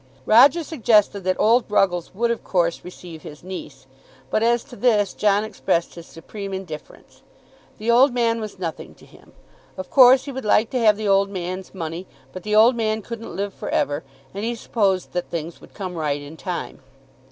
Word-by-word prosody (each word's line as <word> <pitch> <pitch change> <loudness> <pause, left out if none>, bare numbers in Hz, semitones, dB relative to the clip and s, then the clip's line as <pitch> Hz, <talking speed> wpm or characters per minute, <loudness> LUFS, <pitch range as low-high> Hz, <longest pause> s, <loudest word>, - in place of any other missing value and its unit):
Roger 270 +9 +6
suggested 220 -10 +2
that 185 0 -1
old 235 +3 +4
Ruggles 185 -4 +1
would, 235 +3 +1
of 235 - -3
course, 170 -3 0
receive 175 -3 -10
his 150 +1 -11
niece; 150 -8 -9 0.5
but 215 - +1
as 235 +1 +2
to 250 - -13
this 215 -5 +2
John 205 0 +2
expressed 190 -5 -1
his 170 -1 -11
supreme 195 +4 -7
indifference. 175 -5 -10 0.6
The 225 +2 0
old 255 +4 +5
man 230 -2 0
was 215 -2 -7
nothing 170 -3 -6
to - - -18
him. - - -20 0.4
Of 185 -1 -7
course 260 0 +7
he 280 - -5
would 265 0 -6
like 215 +1 +2
to 255 - 0
have 215 -3 +4
the 215 -1 -3
old 195 0 +3
man's 185 0 -6
money; 170 +1 -5 0.3
but 185 - -7
the 210 +3 -1
old 230 +4 +6
man 220 -2 -1
couldn't 230 0 -8
live 200 0 -3
for - - -7
ever, 145 +2 0 0.3
and 200 +2 -5
he 235 +1 -1
supposed 200 -5 -1
that 180 0 -3
things 165 0 -6
would - - -17
come 185 -3 -5
right 150 -4 -2
in 145 +2 -10
time. 175 -2 -5
200 Hz, 195 wpm, -22 LUFS, 180-230 Hz, 0.6 s, course